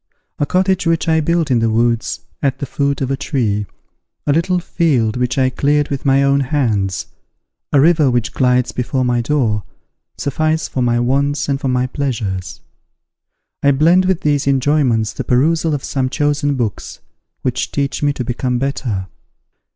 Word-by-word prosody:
A 145 - +1
cottage 185 -1 +1
which 165 0 +1
I 160 -1 +3
built 165 -1 0
in 120 - +3
the 115 0 +1
woods, 115 +1 0 0.2
at 135 -2 0
the 140 - -4
foot 140 +1 -1
of 135 0 -1
a - - +1
tree, 115 -8 -1 0.6
a 145 - +2
little 175 +4 +1
field 145 -11 0
which 125 0 -1
I 130 -1 +2
cleared 145 +2 +1
with 140 0 -4
my 135 +1 +4
own 140 0 +3
hands, 115 - 0 0.7
a 140 - +4
river 155 -1 +4
which 120 -2 -1
glides 125 -1 +2
before 130 +1 -1
my 120 -1 +1
door, 115 -5 0 0.6
suffice 155 +3 -1
for 130 - -3
my 120 -1 +2
wants 140 +4 0
and 140 -1 -1
for 135 - -1
my 125 0 +1
pleasures. 110 -9 -3 1.0
I 140 - +4
blend 165 +7 +4
with 185 -2 +1
these 145 -2 +1
enjoyments 130 -5 +2
the - - -4
perusal 155 +5 +2
of 140 - -5
some 130 -2 -1
chosen 145 0 0
books, 115 -6 -4 0.4
which - - -1
teach 140 -1 -2
me 145 -1 +2
to 125 - -4
become 125 +1 -2
better. 120 -7 -2
135 Hz, 170 wpm, -17 LUFS, 125-150 Hz, 1.0 s, my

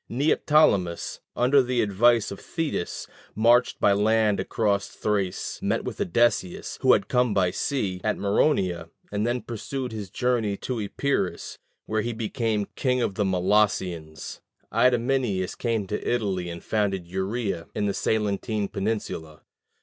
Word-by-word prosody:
Neoptolemus, 130 - +2 0.2
under 130 +3 +4
the 125 -1 +1
advice 110 +3 +3
of 100 - -7
Thetis, 160 - -3 0.3
marched 120 +3 +4
by 100 - +4
land 105 0 +2
across 100 -3 0
Thrace, 100 -4 -2
met - - 0
with - - -5
Odysseus, 95 -2 0
who - - +6
had - - +1
come 125 -4 +2
by 90 -3 +3
sea, 95 -7 -2
at 110 - 0
Maroneia, 95 - +1 0.2
and 105 +2 0
then 120 +1 -1
pursued 125 +3 -5
his 105 -4 -6
journey 115 -5 0
to 125 -4 -3
Epirus, 140 +7 -2 0.3
where 110 0 0
he 120 +2 -3
became 110 -1 -1
king 125 -2 +1
of 110 - 0
the 105 - 0
Molossians. 90 -5 0 0.3
Idomeneus 120 -6 +2
came 115 -4 -1
to 105 +2 -4
Italy, 95 -7 -1
and 85 0 -7
founded 100 -4 0
Uria 95 0 -3
in 105 - 0
the 100 - 0
Salentine 105 -1 -1
peninsula. 95 -7 -4
105 Hz, 140 wpm, -25 LUFS, 95-120 Hz, 0.3 s, who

